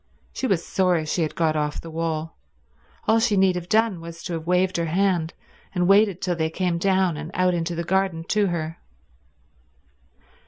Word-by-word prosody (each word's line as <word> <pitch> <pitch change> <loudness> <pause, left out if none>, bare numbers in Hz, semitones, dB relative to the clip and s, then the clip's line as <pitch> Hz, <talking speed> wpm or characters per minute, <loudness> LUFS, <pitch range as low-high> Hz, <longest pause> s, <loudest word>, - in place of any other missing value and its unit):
She 265 - -2
was 180 -7 0
sorry 180 -4 +1
she 160 +3 -1
had 155 - -2
got 160 -2 +1
off 150 -1 -1
the 165 - -8
wall. 160 0 -3 0.7
All 220 +1 +4
she 225 -3 +2
need 190 -1 +4
have 180 0 -6
done 220 -5 +2
was 170 0 -9
to 175 - -4
have 165 0 -5
waved 180 +1 +2
her 170 -1 -1
hand, 175 -1 0 0.4
and 180 -1 +2
waited 200 -1 +4
till 180 -2 0
they 160 -1 0
came 175 0 -1
down 190 -3 +2
and 155 +2 -6
out 185 0 +2
into 170 0 -2
the 170 - -2
garden 190 -2 0
to 210 -1 +2
her. 165 -2 -3
175 Hz, 190 wpm, -24 LUFS, 165-190 Hz, 0.7 s, All